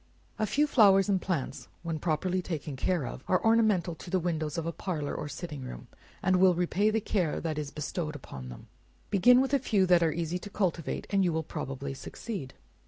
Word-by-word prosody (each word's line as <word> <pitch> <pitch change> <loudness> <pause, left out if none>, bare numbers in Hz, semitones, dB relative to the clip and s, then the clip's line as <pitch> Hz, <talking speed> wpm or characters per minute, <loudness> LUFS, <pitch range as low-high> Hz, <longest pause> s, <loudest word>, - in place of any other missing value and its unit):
A 215 - +1
few 290 +9 +3
flowers 205 -8 +5
and 190 -2 +2
plants, 145 -7 -3 0.2
when 165 -2 -3
properly 180 +4 0
taken 155 -5 -4
care 160 +2 0
of, 120 +2 -7
are 185 - +2
ornamental 215 -6 +3
to 170 - -10
the 185 - +2
windows 160 -2 -2
of 165 - -2
a 170 - -1
parlor, 160 -5 -3
or 150 - -4
sitting 150 -1 -6
room; - - -8 0.4
and 185 0 +3
will 185 -1 +5
repay 180 +4 +2
the 220 +1 +1
care 185 -6 0
that 155 -2 -2
is 150 -2 -4
bestowed 150 0 -4
on 65 -2 -7
them. - - -10 0.5
Begin 245 +6 +6
with 270 +1 -1
a 280 - +5
few 205 -7 +2
that 180 -1 +5
are 165 -1 +3
easy 170 +2 -2
to 205 - -9
cultivate, 180 -5 -1
and 195 -1 +3
you 175 - +2
will 160 0 -1
probably 135 -1 -5
succeed. 155 - -7
175 Hz, 210 wpm, -29 LUFS, 150-195 Hz, 0.5 s, Begin